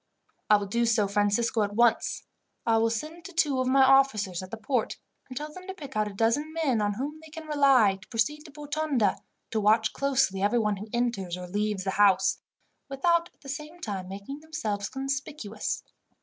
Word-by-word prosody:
"I 210 Hz, -, +8 dB
will 205 Hz, -, -3 dB
do 235 Hz, +4 st, 0 dB
so, 220 Hz, -3 st, +3 dB
Francisco, 205 Hz, +3 st, +1 dB
at 205 Hz, 0 st, -1 dB
once. 235 Hz, 0 st, +2 dB, 0.4 s
I 225 Hz, -1 st, +3 dB
will 230 Hz, 0 st, +3 dB
send 310 Hz, +9 st, -5 dB
to 380 Hz, -, -8 dB
two 300 Hz, -6 st, +2 dB
of 255 Hz, -, 0 dB
my 265 Hz, +1 st, +5 dB
officers 260 Hz, -9 st, +3 dB
at 185 Hz, -, -9 dB
the 225 Hz, -, -6 dB
port, 225 Hz, +1 st, -1 dB, 0.3 s
and 255 Hz, -, -7 dB
tell 300 Hz, +1 st, -5 dB
them 370 Hz, +2 st, -11 dB
to 380 Hz, -, -6 dB
pick 285 Hz, -7 st, -10 dB
out 215 Hz, 0 st, +1 dB
a 205 Hz, -, -7 dB
dozen 230 Hz, +9 st, +1 dB
men 285 Hz, -9 st, +1 dB
on 205 Hz, -1 st, 0 dB
whom 290 Hz, +6 st, -4 dB
they 320 Hz, -, -13 dB
can 320 Hz, +1 st, -9 dB
rely, 275 Hz, -9 st, +4 dB
to 215 Hz, -, -15 dB
proceed 255 Hz, +6 st, -1 dB
to 300 Hz, -, -12 dB
Botonda, 295 Hz, -6 st, 0 dB
and -, -, -15 dB, 0.3 s
to 220 Hz, -, 0 dB
watch 220 Hz, +2 st, +3 dB
closely 265 Hz, -9 st, +1 dB
everyone 210 Hz, 0 st, +2 dB
who 210 Hz, +3 st, -8 dB
enters 230 Hz, -7 st, -1 dB
or 180 Hz, -, -6 dB
leaves 205 Hz, +1 st, -1 dB
the 190 Hz, -, -1 dB
house, 195 Hz, -1 st, +3 dB, 0.5 s
without 340 Hz, +5 st, +1 dB
at -, -, -40 dB
the 275 Hz, -, -13 dB
same 300 Hz, +5 st, -6 dB
time 195 Hz, -, -5 dB
making 200 Hz, +9 st, -7 dB
themselves 220 Hz, -11 st, -3 dB
conspicuous. 270 Hz, -5 st, -4 dB
235 Hz, 205 wpm, -27 LUFS, 205-290 Hz, 0.5 s, I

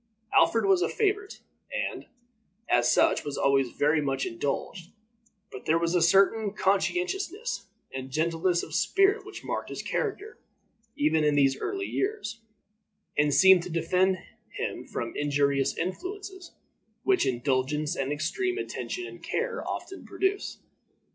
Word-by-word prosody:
Alfred 225 Hz, -2 st, +4 dB
was 190 Hz, -2 st, +4 dB
a 170 Hz, -, +1 dB
favorite, 415 Hz, -1 st, -1 dB, 0.3 s
and, -, -, -3 dB, 0.6 s
as 120 Hz, 0 st, +3 dB
such, -, -, +3 dB
was 145 Hz, -1 st, -4 dB
always 135 Hz, -2 st, +3 dB
very 150 Hz, +4 st, +2 dB
much 135 Hz, -2 st, -1 dB
indulged; 145 Hz, +8 st, -3 dB, 0.6 s
but 130 Hz, -, -9 dB
there 160 Hz, -, +4 dB
was 170 Hz, 0 st, 0 dB
a 180 Hz, -, +3 dB
certain 195 Hz, +4 st, +4 dB
conscientiousness 360 Hz, -, -1 dB, 0.3 s
and 130 Hz, 0 st, -5 dB
gentleness 165 Hz, +4 st, +1 dB
of -, -, -8 dB
spirit 395 Hz, +3 st, +3 dB
which -, -, -10 dB
marked -, -, -3 dB
his -, -, -5 dB
character 435 Hz, +1 st, -3 dB, 0.6 s
even 155 Hz, +1 st, +2 dB
in 150 Hz, -1 st, +3 dB
these 135 Hz, -2 st, +4 dB
early 390 Hz, -1 st, -2 dB
years, 395 Hz, -, -2 dB, 0.8 s
and 145 Hz, 0 st, +3 dB
seemed 190 Hz, +5 st, +7 dB
to 180 Hz, -, -7 dB
defend 180 Hz, +3 st, +2 dB, 0.3 s
him -, -, -5 dB
from 115 Hz, 0 st, -4 dB
the -, -, -3 dB
injurious 140 Hz, -1 st, +1 dB
influences 375 Hz, -, -5 dB, 0.5 s
which 385 Hz, -2 st, +3 dB
indulgence 130 Hz, +4 st, 0 dB
and 135 Hz, 0 st, -2 dB
extreme 275 Hz, -, -1 dB
attention 370 Hz, -2 st, -4 dB
and -, -, -10 dB
care 470 Hz, +1 st, -2 dB
often 385 Hz, -, -6 dB
produce. 385 Hz, +1 st, -2 dB
180 Hz, 140 wpm, -28 LUFS, -, 0.8 s, seemed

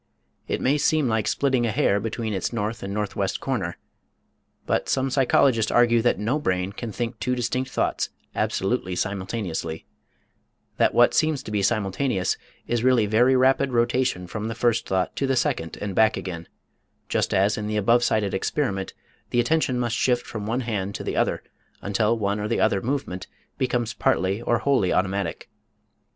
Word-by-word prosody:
It -, -, -2 dB
may 140 Hz, +3 st, +2 dB
seem 155 Hz, -1 st, +2 dB
like 110 Hz, -2 st, 0 dB
splitting 130 Hz, -4 st, +1 dB
a -, -, 0 dB
hair 100 Hz, 0 st, +2 dB
between 110 Hz, +1 st, -3 dB
its 95 Hz, -, -2 dB
north 110 Hz, -1 st, -3 dB
and 100 Hz, -, -5 dB
northwest 100 Hz, -1 st, -2 dB
corner, 105 Hz, -11 st, -2 dB, 0.9 s
but -, -, 0 dB
some 135 Hz, 0 st, +1 dB
psychologists 125 Hz, -3 st, +3 dB
argue 120 Hz, -1 st, +4 dB
that 120 Hz, -3 st, +2 dB
no 115 Hz, +9 st, 0 dB
brain 95 Hz, -6 st, -1 dB
can 115 Hz, +1 st, -6 dB
think 115 Hz, +1 st, -4 dB
two 125 Hz, +1 st, 0 dB
distinct 125 Hz, +2 st, -1 dB
thoughts, -, -, -1 dB, 0.2 s
absolutely 95 Hz, -3 st, -1 dB
simultaneously 95 Hz, -5 st, -3 dB, 0.9 s
that -, -, +2 dB
what -, -, +5 dB
seems 155 Hz, -3 st, +1 dB
to 105 Hz, -, -7 dB
be 105 Hz, -1 st, 0 dB
simultaneous 100 Hz, 0 st, 0 dB, 0.3 s
is 120 Hz, -1 st, -1 dB
really 125 Hz, -4 st, +4 dB
very 120 Hz, +5 st, +4 dB
rapid 135 Hz, +1 st, +3 dB
rotation 120 Hz, -5 st, +1 dB
from 105 Hz, +4 st, -5 dB
the 115 Hz, -, -4 dB
first 115 Hz, 0 st, +1 dB
thought 95 Hz, -1 st, -1 dB
to 140 Hz, -, 0 dB
the 135 Hz, -, +1 dB
second 80 Hz, -9 st, -1 dB
and 100 Hz, -2 st, -4 dB
back 110 Hz, +2 st, +3 dB
again, 90 Hz, -3 st, -6 dB, 0.6 s
just -, -, 0 dB
as 100 Hz, +2 st, +3 dB
in 105 Hz, -1 st, -4 dB
the 105 Hz, 0 st, -1 dB
above 115 Hz, +4 st, +3 dB
cited 105 Hz, -4 st, +1 dB
experiment 95 Hz, -1 st, -2 dB, 0.3 s
the 120 Hz, -, +1 dB
attention 130 Hz, 0 st, +1 dB
must 120 Hz, -2 st, 0 dB
shift 125 Hz, 0 st, +1 dB
from 105 Hz, -2 st, -6 dB
one 120 Hz, +4 st, 0 dB
hand 100 Hz, -5 st, -3 dB
to -, -, -5 dB
the -, -, -3 dB
other -, -, 0 dB, 0.4 s
until 105 Hz, +3 st, +1 dB
one 100 Hz, -1 st, -1 dB
or 105 Hz, -, -2 dB
the 115 Hz, -, 0 dB
other 100 Hz, -, +2 dB
movement 120 Hz, -8 st, -3 dB, 0.3 s
becomes 125 Hz, -3 st, 0 dB
partly 95 Hz, +4 st, +1 dB
or 120 Hz, 0 st, +1 dB
wholly 125 Hz, -9 st, +2 dB
automatic. 95 Hz, +1 st, -1 dB
110 Hz, 175 wpm, -24 LUFS, 100-125 Hz, 0.9 s, what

